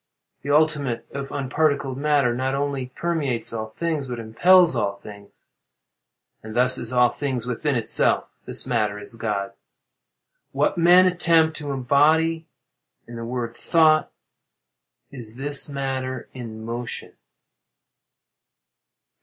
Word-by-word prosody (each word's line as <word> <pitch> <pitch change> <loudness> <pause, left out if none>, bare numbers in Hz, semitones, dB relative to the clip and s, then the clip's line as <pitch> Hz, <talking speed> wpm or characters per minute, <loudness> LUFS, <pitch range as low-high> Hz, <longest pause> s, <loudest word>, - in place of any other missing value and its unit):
The 140 - -7
ultimate, 145 -5 +1
or 140 0 -5
unparticled 140 0 0
matter, 140 -3 +1
not 130 +2 -1
only 140 -2 -2
permeates 145 -10 -1
all 110 -1 -4
things 155 +3 -3
but 125 -1 -5
impels 170 +11 +4
all 100 -1 -1
things; 100 0 -14 1.0
and 110 +1 -9
thus 125 +1 +3
is 120 0 -1
all 125 -1 +4
things 130 -5 -3
within 130 +4 -2
itself. 115 -2 +1 0.2
This - - -4
matter 110 -5 -1
is 105 +2 -7
God. 105 -3 -3 1.0
What - - +1
men 175 +2 +6
attempt 165 -3 +3
to 145 -2 -6
embody 155 +5 +2 0.6
in 120 - -10
the 115 - -6
word 120 -1 -4
"thought," 155 -2 +3 1.0
is 120 -4 -9
this 145 +3 -1
matter 130 -2 -4
in 110 -3 -8
motion. 120 +1 -5
130 Hz, 120 wpm, -23 LUFS, 115-150 Hz, 1.0 s, men